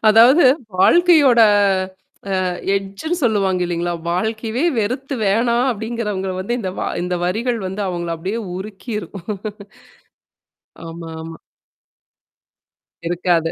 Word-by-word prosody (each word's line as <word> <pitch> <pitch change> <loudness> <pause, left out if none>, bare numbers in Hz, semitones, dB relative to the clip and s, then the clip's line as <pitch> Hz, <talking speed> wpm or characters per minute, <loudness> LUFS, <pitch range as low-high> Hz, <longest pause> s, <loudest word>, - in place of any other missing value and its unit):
அதாவது 235 +9 +7 0.3
வாழ்க்கையோட 305 - +5 1.0
அ - - 0 0.3
எட்ஜ்ன்னு 200 - -3
சொல்லுவாங்க 195 -5 +1
இல்லைங்களா? 175 0 -2 0.2
வாழ்க்கையவே 220 - -1
வெறுத்து 255 +6 -2
வேணாம் 235 +5 +2
அப்டிங்கிறவங்கள 210 -4 -3
வந்து 240 +6 -2
இந்த 190 -4 -3
வ - - -2 0.2
இந்த 180 0 -1
வரிகள் 230 +7 -1
வந்து 190 +3 -4
அவங்கள 175 -2 -3
அப்டியே 195 +8 -3 0.2
உருக்கிரும். 210 +2 -6 1.7
ஆமா, 165 0 -8
ஆமா. 165 0 -8 1.7
இருக்காது. 170 -2 +1
210 Hz, 100 wpm, -19 LUFS, 180-235 Hz, 1.7 s, அதாவது